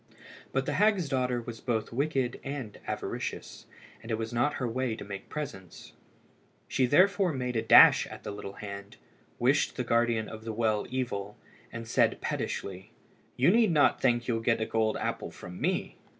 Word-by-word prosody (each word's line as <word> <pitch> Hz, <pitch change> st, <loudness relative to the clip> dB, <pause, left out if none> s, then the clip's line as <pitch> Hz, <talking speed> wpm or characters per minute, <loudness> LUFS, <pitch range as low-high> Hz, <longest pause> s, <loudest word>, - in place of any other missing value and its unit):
But 135 Hz, 0 st, 0 dB
the 145 Hz, -, -1 dB
hag's 200 Hz, -1 st, +3 dB
daughter 125 Hz, -2 st, 0 dB
was 115 Hz, -1 st, -7 dB
both 115 Hz, -3 st, -2 dB
wicked 135 Hz, -2 st, -1 dB
and 135 Hz, -6 st, -6 dB
avaricious, -, -, -5 dB, 0.3 s
and 115 Hz, -, -11 dB
it 110 Hz, -, 0 dB
was 115 Hz, +1 st, -4 dB
not 120 Hz, +5 st, +1 dB
her 125 Hz, -, -2 dB
way 125 Hz, 0 st, -1 dB
to -, -, -8 dB
make 100 Hz, -1 st, -8 dB
presents. 140 Hz, -, -7 dB, 0.7 s
She 130 Hz, -, +1 dB
therefore 185 Hz, +4 st, +4 dB
made 125 Hz, -2 st, -3 dB
a 110 Hz, -, +2 dB
dash -, -, +7 dB
at -, -, -10 dB
the -, -, -5 dB
little 100 Hz, -1 st, -7 dB
hand, 100 Hz, 0 st, -8 dB, 0.4 s
wished 130 Hz, +4 st, +2 dB
the 125 Hz, -, -2 dB
guardian 115 Hz, -2 st, +1 dB
of 110 Hz, 0 st, -9 dB
the 110 Hz, -1 st, -4 dB
well 110 Hz, -2 st, 0 dB
evil, 105 Hz, -6 st, -3 dB, 0.3 s
and 115 Hz, 0 st, -7 dB
said 115 Hz, -, +2 dB
pettishly 95 Hz, -1 st, -4 dB, 0.5 s
"You 135 Hz, +8 st, +5 dB
need 225 Hz, -2 st, +4 dB
not 150 Hz, -3 st, +3 dB
think 120 Hz, -2 st, +2 dB
you'll 115 Hz, -2 st, 0 dB
get 115 Hz, 0 st, +1 dB
a 110 Hz, -, 0 dB
gold 110 Hz, -1 st, 0 dB
apple -, -, -3 dB
from 90 Hz, 0 st, -10 dB
me." -, -, -1 dB
120 Hz, 180 wpm, -29 LUFS, 110-135 Hz, 0.7 s, dash